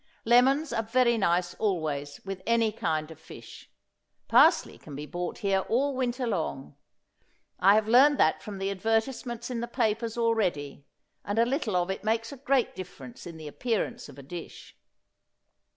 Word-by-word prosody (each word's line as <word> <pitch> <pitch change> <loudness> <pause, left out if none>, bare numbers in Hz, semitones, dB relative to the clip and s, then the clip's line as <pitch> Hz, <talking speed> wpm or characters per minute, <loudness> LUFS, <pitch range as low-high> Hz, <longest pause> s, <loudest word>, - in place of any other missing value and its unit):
Lemons 265 +6 +4
are - - +1
very 235 +2 +2
nice 175 -4 +1
always 155 -8 -2
with 195 -1 -5
any 230 -1 +3
kind 155 -6 -2
of 160 - -12
fish. 120 -7 -13 0.6
Parsley - - +4
can 145 - -10
be 145 +2 -6
bought 175 +3 -5
here 195 -3 +1
all 270 +4 +1
winter 250 0 -1
long. 160 - -3 0.8
I 195 +2 +6
have 215 0 +2
learned 270 +5 +6
that 155 - +3
from 205 -2 -7
the 195 +1 -2
advertisements 225 +4 -2
in 240 - -2
the 235 - -3
papers 230 -1 -1
already; 185 -12 -1 0.4
and 205 +2 -3
a 230 - +5
little 245 - -1
of 180 +1 +1
it 190 - -5
makes 225 +1 -1
a 280 - -8
great 270 -2 +1
difference 170 -8 -9
in 170 -2 -9
the 155 -1 -9
appearance 225 - -3
of - - -13
a 140 - -10
dish. 170 +4 -9
215 Hz, 170 wpm, -28 LUFS, 175-235 Hz, 0.8 s, I